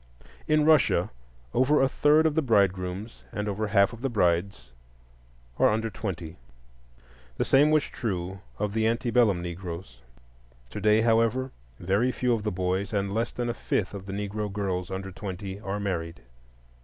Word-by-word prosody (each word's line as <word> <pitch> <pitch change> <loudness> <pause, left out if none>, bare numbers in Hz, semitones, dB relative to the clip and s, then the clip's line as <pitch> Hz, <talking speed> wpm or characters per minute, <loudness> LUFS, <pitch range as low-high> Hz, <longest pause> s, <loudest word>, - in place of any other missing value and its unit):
In 155 -1 +3
Russia 155 -3 +4 0.4
over 135 +4 +3
a 135 - +4
third 150 +3 +3
of 160 - +3
the 160 - +2
bridegrooms 100 - 0
and 105 0 -3
over 105 +1 -2
half 100 0 +4
the 135 - -1
brides 90 - 0 0.9
are - - +5
under 110 +1 -1
twenty; 90 -4 -5 1.0
the - - 0
same 145 +3 +5
was 155 -1 +4
true 95 -4 -4 0.2
of 105 0 -2
the 110 0 +2
antebellum 115 -5 +2
Negroes. 85 -7 -7 0.7
Today, 105 +1 +3
however, 115 +3 +2 0.3
very 100 +8 +1
few 125 -1 0
of 115 - -1
the 105 0 -2
boys 95 +3 -2
and 100 -1 -1
less 115 +2 -1
than 120 -1 -3
a 120 - -1
fifth 105 -4 -2
of 100 -1 -8
the 95 - -5
Negro 105 +1 -3
girls 95 -3 -2
under 95 0 -5
twenty 95 0 -6
are 100 0 -4
married. 85 -4 -3
105 Hz, 155 wpm, -27 LUFS, 95-115 Hz, 1.0 s, are